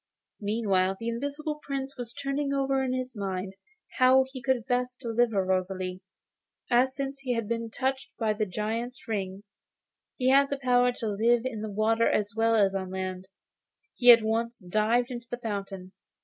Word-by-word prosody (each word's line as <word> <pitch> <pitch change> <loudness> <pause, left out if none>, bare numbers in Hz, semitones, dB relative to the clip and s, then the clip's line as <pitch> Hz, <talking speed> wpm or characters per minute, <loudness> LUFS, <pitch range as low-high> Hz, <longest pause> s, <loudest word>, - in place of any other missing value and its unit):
Meanwhile 200 -3 +1
the 230 - -3
Invisible 285 +5 -3
Prince 275 -1 -4
was 245 -2 -5
turning 275 +2 -2
over 270 -1 +1
in 260 - -1
his 255 -1 -3
mind 190 -2 -3 0.5
how 260 +1 +6
he 260 - -6
could 260 -4 0
best 250 0 -1
deliver 230 -5 +1
Rosalie. 185 0 -2 0.7
As, 255 +2 +3
since 275 0 -4
he 255 -2 -2
had 230 -2 -2
been 230 0 -2
touched 265 +3 -2
by 220 -2 +1
the 210 0 -1
Giant's 225 +7 -4
ring, 195 -2 -3 0.7
he 255 -1 +2
had 275 +1 +5
the 280 - -2
power 250 -2 +3
to 235 -2 -4
live 230 +4 +2
in 225 -5 -3
the 215 - -4
water 220 +3 +2
as 205 -1 0
well 225 0 +3
as 200 -3 +3
on 190 -1 -3
land, 185 0 -5 0.6
he 245 -1 +7
at 230 -2 +7
once 230 +2 -1
dived 225 +6 +2
into 240 -1 -7
the 245 - -3
fountain. 195 -5 -5
230 Hz, 175 wpm, -28 LUFS, 205-255 Hz, 0.7 s, he